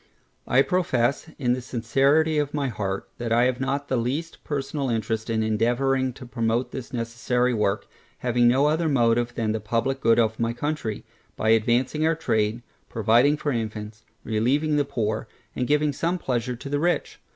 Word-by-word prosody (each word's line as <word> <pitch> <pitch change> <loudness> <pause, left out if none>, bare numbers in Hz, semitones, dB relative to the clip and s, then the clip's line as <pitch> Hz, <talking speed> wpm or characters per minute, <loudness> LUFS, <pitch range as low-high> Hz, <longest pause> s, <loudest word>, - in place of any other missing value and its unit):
I 130 +2 +4
profess 140 -6 0
in 125 -4 +1
the 125 - -3
sincerity 135 +6 +2
of 145 0 -2
my 140 -2 0
heart, 100 -4 -3
that 120 -1 -3
I 120 +1 +4
have 125 0 +1
not 140 +2 -2
the 130 - 0
least 140 +8 -3
personal 140 -1 -2
interest 110 -1 -2
in 110 -1 +1
endeavouring 125 +4 +1
to 130 0 -11
promote 120 0 -1
this 130 -1 -7
necessary 120 +1 0
work, 105 -2 0 0.3
having 120 -1 +2
no 130 +4 +4
other 160 +2 +2
motive 120 -3 +2
than 110 -2 0
the 110 - -1
publick 115 +5 -1
good 115 -2 +4
of 110 -2 +1
my 115 0 0
country, 120 -4 -3 0.3
by 110 - 0
advancing 120 +6 +2
our 165 - +2
trade, 110 -6 0 0.3
providing 120 +6 +3
for 145 - -2
infants, 110 -2 -4 0.2
relieving 135 +8 +1
the 145 -1 +2
poor, 110 -6 -2 0.3
and 125 - -1
giving 150 0 +2
some 170 +6 -1
pleasure 125 -5 -2
to 125 - -9
the 145 +1 -1
rich. 175 +3 -1
125 Hz, 175 wpm, -25 LUFS, 115-140 Hz, 0.3 s, I